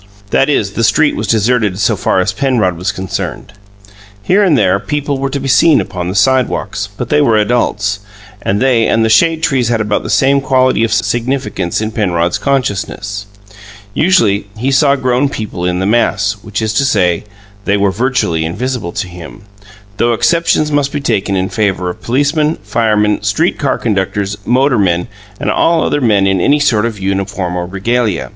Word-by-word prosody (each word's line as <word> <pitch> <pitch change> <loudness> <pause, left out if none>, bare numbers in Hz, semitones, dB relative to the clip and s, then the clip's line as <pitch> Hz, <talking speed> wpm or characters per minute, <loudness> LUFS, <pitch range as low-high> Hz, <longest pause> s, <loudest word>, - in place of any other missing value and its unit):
That 135 - +2
is, 105 -9 0
the 115 - -1
street 145 +8 +3
was 110 - -3
deserted 110 -2 +1
so 105 +2 +1
far 95 - 0
as 90 - 0
Penrod 125 -10 0
was 90 +4 -2
concerned. 95 +1 -5 0.7
Here 195 - +3
and 170 -7 +3
there - - +2
people 145 -2 -3
were 135 0 -1
to 140 - -3
be 135 - -4
seen 145 +3 +4
upon 90 -1 -4
the 95 - -4
sidewalks, 130 +5 0
but - - -4
they 75 - +3
were 110 +4 +3
adults, 105 -2 0 0.4
and 100 +1 -1
they 125 -4 +2
and 115 0 +2
the - - +1
shade 165 +5 +3
trees 130 -6 +1
had 115 -1 +1
about 105 -1 0
the - - -7
same 140 +1 +3
quality 130 -3 +2
of 115 - 0
significance 110 -4 -1
in 110 0 -3
Penrod's 90 -6 0
consciousness. 105 -6 -2 0.7
Usually 110 - +2
he 130 +5 -1
saw 140 +1 +3
grown 130 +1 0
people 105 -8 -5
in 90 0 0
the 95 - -1
mass, 105 -2 +1
which 105 +1 -4
is 110 -1 -1
to - - +2
say, 90 -9 +1 0.4
they 100 0 +2
were 100 -1 +1
virtually 115 -7 0
invisible 105 +2 -3
to - - -3
him, 90 +4 -11 0.5
though 120 0 +2
exceptions 165 +3 +1
must 145 -1 +1
be 145 - -2
taken 105 -7 -1
in 95 0 -1
favour 95 -2 -1
of - - -13
policemen, 145 +5 0
firemen, 105 -1 +1
street 130 - 0
car 140 -4 0
conductors, 100 -2 -2
motormen, 115 -9 +2 0.3
and - - -1
all 165 -1 +2
other 145 - 0
men 105 -5 +3
in 95 -2 +1
any 145 +8 +3
sort 115 -6 +2
of 110 -3 -6
uniform 95 -1 -2
or 90 -1 -3
regalia. 105 +1 -1
110 Hz, 180 wpm, -14 LUFS, 100-135 Hz, 0.7 s, seen